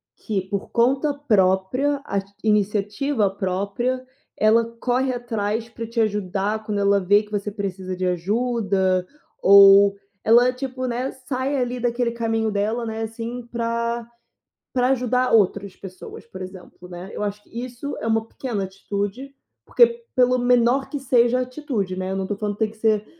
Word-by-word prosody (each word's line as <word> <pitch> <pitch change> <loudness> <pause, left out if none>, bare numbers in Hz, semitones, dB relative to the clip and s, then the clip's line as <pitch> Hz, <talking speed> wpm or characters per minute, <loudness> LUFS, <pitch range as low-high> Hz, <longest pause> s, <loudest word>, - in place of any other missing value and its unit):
que, 205 -4 -2
por 200 -1 -3
conta 270 +5 +2
própria, 250 +2 +1
as 200 -1 -1 0.2
iniciativa 210 +3 +1
própria, 200 +7 -2 0.3
ela 225 +2 +4
corre 255 +1 0
atrás 225 -2 -2
pra 230 -1 -7
te 230 0 -3
ajudar 205 0 -1
quando 210 -1 -3
ela 200 0 +3
vê 205 +3 +3
que 210 - -18
você 205 0 -2
precisa 190 -2 -4
de 185 0 -2
ajuda, 190 -1 0 0.4
ou 200 0 +8 0.3
ela, 240 +3 +5
tipo, 255 0 -4
né, 250 +2 -2
sai 260 +2 -3
ali 250 -1 -1
daquele 240 0 0
caminho 225 -1 -1
dela, 215 +4 -1
né, 225 0 -4
assim, 230 +2 -6
pra 235 0 -2 0.7
pra 250 -1 +2
ajudar 255 -1 +1
outras 200 -2 +2
pessoas, 190 +4 -11
por 185 -4 -9
exemplo, 185 -1 -11
né. 180 +2 -8
Eu - - -4
acho 210 0 -3
que - - -27 0.2
isso 255 +3 -6
é 225 - -5
uma 225 0 +1
pequena 225 -7 -4
atitude, 205 +7 -5 0.3
porque, 470 -1 +3
pelo 255 0 +4
menor 245 +2 +2
que 290 - -3
seja 245 -2 +3
a 255 - +1
atitude, 250 - -3
né, 185 0 -3
eu 190 - -2
não 190 -1 -2
tô 205 - -3
falando 205 -1 -3
que - - -26
tem 215 - -3
que 220 - -17
ser 215 -1 +1
225 Hz, 165 wpm, -23 LUFS, 200-250 Hz, 0.7 s, ou